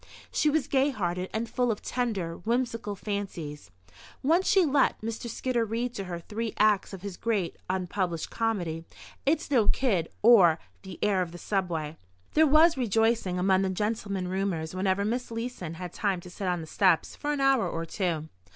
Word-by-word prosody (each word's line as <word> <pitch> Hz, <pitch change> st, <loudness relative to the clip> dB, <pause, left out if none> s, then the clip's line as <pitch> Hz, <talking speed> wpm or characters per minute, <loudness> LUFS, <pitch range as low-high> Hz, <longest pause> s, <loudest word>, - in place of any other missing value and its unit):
She 305 Hz, -, +2 dB
was 300 Hz, -1 st, +1 dB
gay 275 Hz, +1 st, +3 dB
hearted 180 Hz, -7 st, -2 dB
and 225 Hz, +1 st, -2 dB
full 245 Hz, 0 st, +1 dB
of 210 Hz, -, -5 dB
tender, 205 Hz, -9 st, -2 dB
whimsical 230 Hz, -1 st, -1 dB
fancies. 185 Hz, -8 st, -5 dB, 0.5 s
Once 335 Hz, +7 st, +3 dB
she 380 Hz, -3 st, +5 dB
let 280 Hz, -2 st, +2 dB
Mr. 225 Hz, +2 st, -4 dB
Skidder 240 Hz, +1 st, 0 dB
read 230 Hz, +3 st, -2 dB
to 195 Hz, -5 st, -5 dB
her 175 Hz, -1 st, -4 dB
three 220 Hz, +6 st, -4 dB
acts 210 Hz, -2 st, +3 dB
of 195 Hz, -2 st, -9 dB
his 200 Hz, -3 st, -6 dB
great 210 Hz, -7 st, -1 dB
(unpublished) 180 Hz, -2 st, -2 dB
comedy, 180 Hz, -8 st, -1 dB, 0.4 s
"It's 310 Hz, 0 st, +1 dB
No 235 Hz, -7 st, +4 dB
Kid; 195 Hz, -11 st, +1 dB
or, 195 Hz, -9 st, +7 dB, 0.2 s
The 190 Hz, -3 st, -9 dB
Heir 200 Hz, -3 st, +3 dB
of 175 Hz, -2 st, -3 dB
the 175 Hz, -, -9 dB
Subway." 170 Hz, -5 st, -2 dB, 0.4 s
There 315 Hz, 0 st, +5 dB
was 310 Hz, +2 st, +6 dB
rejoicing 225 Hz, -5 st, +1 dB
among 190 Hz, +1 st, +3 dB
the 190 Hz, -, +1 dB
gentlemen 200 Hz, -1 st, -2 dB
roomers 180 Hz, -4 st, -2 dB
whenever 190 Hz, +1 st, +1 dB
Miss 245 Hz, +4 st, -2 dB
Leeson 230 Hz, -8 st, -5 dB
had 180 Hz, 0 st, -7 dB
time 195 Hz, -4 st, 0 dB
to 180 Hz, -, -11 dB
sit 190 Hz, +1 st, -4 dB
on 175 Hz, -2 st, 0 dB
the -, -, -7 dB
steps 180 Hz, 0 st, +2 dB
for 295 Hz, -, -2 dB
an 290 Hz, -, -1 dB
hour 270 Hz, -3 st, +3 dB
or 165 Hz, 0 st, -3 dB
two. 165 Hz, -3 st, -2 dB
205 Hz, 180 wpm, -28 LUFS, 180-235 Hz, 0.5 s, or